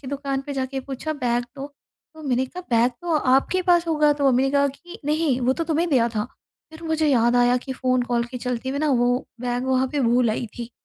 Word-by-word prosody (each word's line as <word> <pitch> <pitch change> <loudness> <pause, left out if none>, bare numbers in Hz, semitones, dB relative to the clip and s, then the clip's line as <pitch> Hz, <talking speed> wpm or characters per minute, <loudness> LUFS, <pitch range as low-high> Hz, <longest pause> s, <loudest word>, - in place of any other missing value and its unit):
कि 270 - -12
दुकान 275 0 -3
पे 285 - -4
जाके 265 0 -3
पूछा 275 +4 -5
बैग 245 -4 -1
दो, 275 +1 -5 0.5
तो 315 - -12
मैंने 260 -2 0
कहा 360 +7 -9
बैग 235 +2 +4
तो 335 -3 +1
आपके 275 +9 +2
पास 345 -1 +3
होगा। 300 -2 +3
तो 280 -2 +2
मम्मी 255 +1 +3
ने 270 - +1
कहा 280 0 +3
कि 345 +6 -11
नहीं 300 -4 +1
वो 250 +2 +2
तो 330 +4 -3
तुम्हें 330 +2 0
दिया 235 -4 +3
था। 210 - 0 0.5
फिर 320 +1 -12
मुझे 315 -1 0
याद 240 -2 +3
आया 245 0 +4
कि 265 - -3
फ़ोन 255 -1 0
कॉल 240 -1 0
के 250 +1 -7
चलते 250 +1 -3
हुए 280 +1 -2
न 310 - 0
वो 245 +1 +2 0.2
बैग 245 0 -2
वहाँ 260 0 +2
पे 290 - 0
भूल 240 -1 +3
आई 235 +2 -2
थी 235 0 -6
265 Hz, 245 wpm, -23 LUFS, 245-300 Hz, 0.5 s, बैग